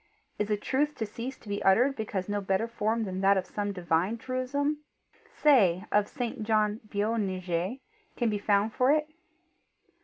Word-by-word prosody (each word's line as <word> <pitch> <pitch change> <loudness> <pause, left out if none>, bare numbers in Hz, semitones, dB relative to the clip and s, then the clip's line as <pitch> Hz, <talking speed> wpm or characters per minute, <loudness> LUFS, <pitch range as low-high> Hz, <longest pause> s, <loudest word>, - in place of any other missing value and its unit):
Is 210 0 -1
a 210 - +1
truth 295 +7 0
to 220 - -2
cease 235 +5 -6
to - - -19
be 205 0 -3
uttered 245 +8 +4
because 205 -5 -3
no 205 0 -1
better 195 +3 0
form 225 0 -1
than 190 -2 -4
that 195 0 +5
of 185 - -1
some 205 +1 -3
divine 180 +3 0
truism 260 +5 -1 0.6
say 205 - +4
of 205 0 +3
St. 245 -5 -4
John 215 0 +1
Boanerges 200 -2 -1 0.4
can 240 - +1
be 205 - -1
found 205 +1 +2
for 255 +2 +3
it? 300 0 +2
210 Hz, 165 wpm, -29 LUFS, 195-245 Hz, 0.6 s, that